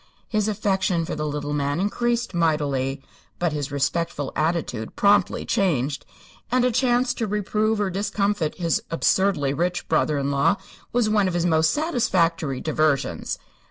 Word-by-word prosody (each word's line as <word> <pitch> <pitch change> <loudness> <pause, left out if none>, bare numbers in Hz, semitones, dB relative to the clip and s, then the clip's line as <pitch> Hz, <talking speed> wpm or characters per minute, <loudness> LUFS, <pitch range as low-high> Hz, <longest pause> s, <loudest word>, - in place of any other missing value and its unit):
His 215 -2 0
affection 190 -5 0
for - - -4
the 150 0 -2
little 145 0 -3
man 145 +1 -1
increased 235 +3 0
mightily, 140 -5 0 0.3
but 175 -3 0
his 145 -2 -3
respectful 145 +1 -1
attitude 155 -8 -1
promptly 205 0 +3
changed, 145 -7 0 0.4
and 250 0 +3
a 250 - +2
chance 250 +1 +2
to 225 - -2
reprove 210 +1 0
or 200 -2 0
discomfit 200 -3 -1
his 170 -2 0
absurdly 165 -4 +2
rich 175 +4 -1
brother 155 -2 +2
in 140 0 -1
law 140 +8 +3 0.4
was 240 -2 +2
one 210 -2 +3
of 180 - -2
his 175 0 +1
most 160 -2 +3
satisfactory 170 - +1
diversions. 155 -3 0
170 Hz, 150 wpm, -24 LUFS, 150-210 Hz, 0.4 s, promptly